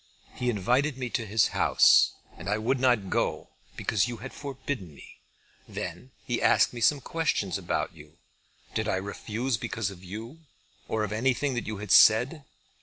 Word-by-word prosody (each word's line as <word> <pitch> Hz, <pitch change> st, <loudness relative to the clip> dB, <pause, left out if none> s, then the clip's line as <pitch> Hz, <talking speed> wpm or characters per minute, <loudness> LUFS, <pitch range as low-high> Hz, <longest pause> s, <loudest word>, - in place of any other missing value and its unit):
He 125 Hz, -, -2 dB
invited 125 Hz, +7 st, +1 dB
me 125 Hz, -2 st, -4 dB
to 115 Hz, -3 st, -2 dB
his 105 Hz, +1 st, +3 dB
house -, -, +5 dB, 0.2 s
and 90 Hz, -, -7 dB
I 105 Hz, -, +1 dB
would 125 Hz, +5 st, 0 dB
not 120 Hz, -7 st, +2 dB
go, -, -, -1 dB, 0.3 s
because 110 Hz, +1 st, 0 dB
you 120 Hz, -1 st, -5 dB
had 130 Hz, +5 st, -9 dB
forbidden 135 Hz, -, -6 dB
me. -, -, -15 dB, 0.5 s
Then 125 Hz, -, -6 dB, 0.2 s
he 120 Hz, -, -1 dB
asked -, -, +4 dB
me 120 Hz, -, -7 dB
some 140 Hz, +4 st, +3 dB
questions 145 Hz, -, -1 dB
about -, -, -2 dB
you. -, -, -16 dB, 0.6 s
Did -, -, -1 dB
I -, -, +1 dB
refuse 110 Hz, +5 st, -3 dB
because 110 Hz, -3 st, -3 dB
of 95 Hz, -1 st, -13 dB
you, 110 Hz, -, -8 dB, 0.5 s
or 110 Hz, -1 st, -1 dB
of 105 Hz, -, -3 dB
anything 130 Hz, +5 st, 0 dB
that 120 Hz, -, -3 dB
you 110 Hz, -1 st, -4 dB
had 105 Hz, -1 st, -6 dB
said? 125 Hz, +7 st, +5 dB
115 Hz, 175 wpm, -27 LUFS, 105-130 Hz, 0.6 s, house